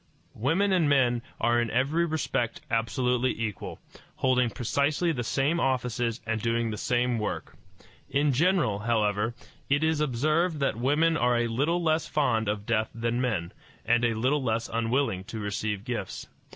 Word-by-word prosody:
Women 165 - +1
and 170 -5 +3
men 125 -4 +3 0.2
are 120 0 +3
in 120 - -1
every 140 +9 +1
respect 135 -7 -2
absolutely 125 +2 0
equal, 105 -4 -4 0.4
holding 125 -2 +2
precisely 145 +8 0
the 125 -6 -2
same 140 +8 +1
offices 125 -4 -1
and 110 -1 -1
doing 115 0 0
the 105 - -4
same 120 -1 +1
work. 105 - -4 0.5
In 140 +1 +2
general, 165 - +2
however, 110 0 0 0.3
it 145 +2 +2
is 160 -1 +1
observed 155 +5 +1
that 140 - +1
women 150 +7 +2
are 125 -2 +2
a 120 - +1
little 150 +10 0
less 160 -1 +1
fond 115 -8 +1
of 105 -1 -2
death 110 -1 +1
than 115 +1 -1
men, 105 -9 -1 0.3
and 120 +1 +3
a 115 -1 +2
little 130 +6 +1
less 115 -2 -1
unwilling 115 -3 0
to 115 +1 -7
receive 105 0 -3
gifts. 115 -7 -4
120 Hz, 160 wpm, -27 LUFS, 115-145 Hz, 0.5 s, and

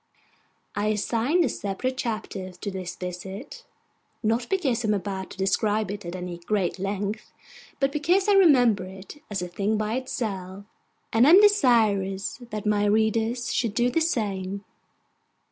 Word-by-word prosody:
I 205 +1 0
assign 230 - +1
a - - +2
separate 210 +6 -3
chapter 215 -7 -4
to 200 +3 -6
this 185 -1 -5
visit; 185 - -7 0.6
not 230 +3 0
because 270 - 0
I - - 0
am 210 - +3
about 195 -1 -4
to - - -11
describe 205 +2 +1
it 205 -3 -6
at 175 - -5
any 180 -1 -6
great 190 0 -1
length, 205 +2 -3 0.5
but 275 0 +2
because 345 +7 +2
I 410 - +5
remember 250 - +5
it 190 +10 -11
as 195 -3 -2
a - - -3
thing 200 +4 -1
by 215 +1 -1
itself, 200 -7 -4 0.5
and 230 +4 +5
am 350 +5 +9
desirous 220 - +3
that 215 -2 -5
my 210 -1 +2
readers 220 +3 +1
should 225 -4 0
do 245 +1 +2
the 330 - +1
same. 200 - -2
210 Hz, 155 wpm, -25 LUFS, 195-245 Hz, 0.6 s, am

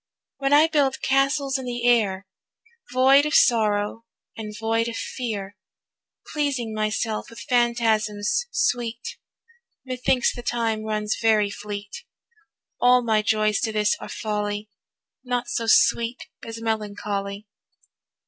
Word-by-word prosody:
When 275 0 0
I 295 +2 +7
build 285 -4 +1
castles 275 0 +1
in 260 - -6
the 240 0 -2
air, 200 -5 +2 0.7
Void 270 +3 +5
of 300 - -1
sorrow 215 -1 +3 0.3
and 215 -1 -6
void 225 +1 0
of 235 - -4
fear, 205 -5 -5 0.8
Pleasing 275 -7 -1
myself 215 +1 -2
with 230 - -11
phantasms 235 - +1
sweet, 240 - -2 0.7
Methinks 255 -1 +1
the 240 - -6
time 230 -2 -1
runs 215 -1 -1
very 215 -3 +3
fleet. 205 0 -7 0.8
All 250 0 +5
my 220 -2 +2
joys 215 -1 +1
to 220 - -1
this 210 -1 +1
are - - -8
folly, 210 -1 -3 0.5
Naught 245 -1 -2
so 230 -1 -2
sweet 235 +2 +3 0.2
as 225 0 -7
melancholy. 205 -2 -3
225 Hz, 120 wpm, -24 LUFS, 210-245 Hz, 0.8 s, I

